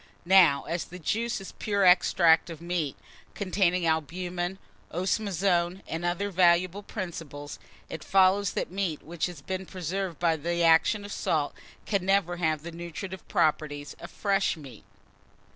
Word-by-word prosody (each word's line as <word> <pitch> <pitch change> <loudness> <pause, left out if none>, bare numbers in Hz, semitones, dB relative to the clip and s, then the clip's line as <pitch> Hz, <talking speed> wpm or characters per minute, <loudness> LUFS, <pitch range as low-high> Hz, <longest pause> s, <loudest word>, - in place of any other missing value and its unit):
Now, 175 -6 +6
as 170 0 -3
this 180 - -10
juice 230 +7 -1
is 195 - -9
pure 200 -2 0
extract 170 -2 +5
of 165 -3 -8
meat, 170 -4 -2 0.4
containing 185 -3 +1
albumen, 175 +3 -2 0.3
osmazome, 185 -1 0
and 165 +1 -4
other 175 +4 -1
valuable 180 +1 +3
principles, 165 -8 -7 0.3
it 160 - -7
follows 195 +1 +3
that - - -3
meat 185 -5 -2
which 170 +2 -2
has 170 -6 -10
been 190 +2 -4
preserved 185 -1 -4
by 165 -1 +1
the 170 +3 -1
action 165 +6 +4
of 205 - -8
salt 150 -6 -1 0.3
can 200 -4 0
never 190 -2 +1
have 155 -3 0
the 170 - -6
nutritive 175 +3 -7
properties 150 -2 0
of - - -9
fresh 195 -3 0
meat. 130 -9 -12
175 Hz, 145 wpm, -28 LUFS, 165-190 Hz, 0.4 s, Now